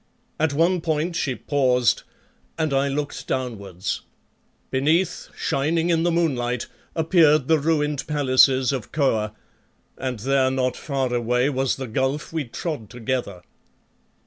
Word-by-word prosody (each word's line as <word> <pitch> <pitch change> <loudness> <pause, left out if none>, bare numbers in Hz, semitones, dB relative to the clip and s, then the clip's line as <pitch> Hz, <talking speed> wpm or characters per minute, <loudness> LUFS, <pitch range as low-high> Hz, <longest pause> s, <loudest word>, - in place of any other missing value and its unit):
At 160 -1 +2
one 170 +4 +2
point 160 +1 -1
she 135 -6 -1
paused 125 -4 +2 0.6
and 155 -3 0
I 135 +1 +2
looked 145 +1 -3
downwards. 105 -6 -3 0.7
Beneath, 155 +7 +1
shining 165 +5 0
in 165 -1 +2
the 175 - +2
moonlight, 125 -8 0 0.3
appeared 155 -4 +4
the 160 -1 +4
ruined 150 -1 0
palaces 135 -3 +4
of 130 -7 -4
Kôr, 110 -8 +1 0.7
and 130 -2 -3
there 130 +3 +2
not 130 -1 0
far 135 -4 -2
away 125 +3 +1
was 135 -1 0
the 135 - -5
gulf 135 +6 -2
we 160 -3 -1
trod 120 - -5
together. 120 -6 -3
135 Hz, 130 wpm, -23 LUFS, 125-155 Hz, 0.7 s, appeared